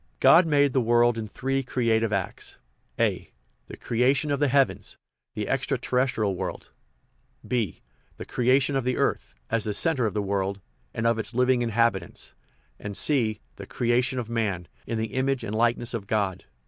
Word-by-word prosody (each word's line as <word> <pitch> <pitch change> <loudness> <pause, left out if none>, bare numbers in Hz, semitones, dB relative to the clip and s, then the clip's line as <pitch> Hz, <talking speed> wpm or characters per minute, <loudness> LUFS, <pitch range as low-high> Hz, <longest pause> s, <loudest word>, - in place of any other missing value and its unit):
God 170 0 +6
made 145 -3 +3
the 130 - +3
world 120 0 +3
in 110 -1 -4
three 135 +5 -2
creative 115 -4 0
acts: 100 -3 -3 0.4
(a) - - 0 0.4
the - - -10
creation 135 +6 +1
of 140 - 0
the 145 - +3
heavens 135 0 +1 0.4
the - - -3
ex - - -1
tra - - 0
terrestrial 120 -6 0
world, - - -6 0.8
(b) 115 -9 -2 0.3
the - - -7
creation 130 +3 +2
of 135 - 0
the 125 0 -1
earth - - -1 0.2
(as 115 -2 +1
the 105 -1 -2
centre 140 -6 +1
of 105 - -5
the 105 - 0
world) 100 0 -1 0.3
and 110 - -3
of 115 -1 +2
its 110 - -2
living 125 0 +3
inhabitants, 115 -6 -1 0.5
and 100 -1 -5
(c) 115 -8 +2 0.2
the - - -9
creation 125 +2 0
of 120 -3 -3
man 105 -7 -2 0.2
(in 115 - -2
the 110 -1 -3
image 130 -1 0
and 105 - -4
likeness 120 +1 +1
of 105 -4 -4
God). 100 -4 -1
120 Hz, 175 wpm, -26 LUFS, 110-130 Hz, 0.8 s, God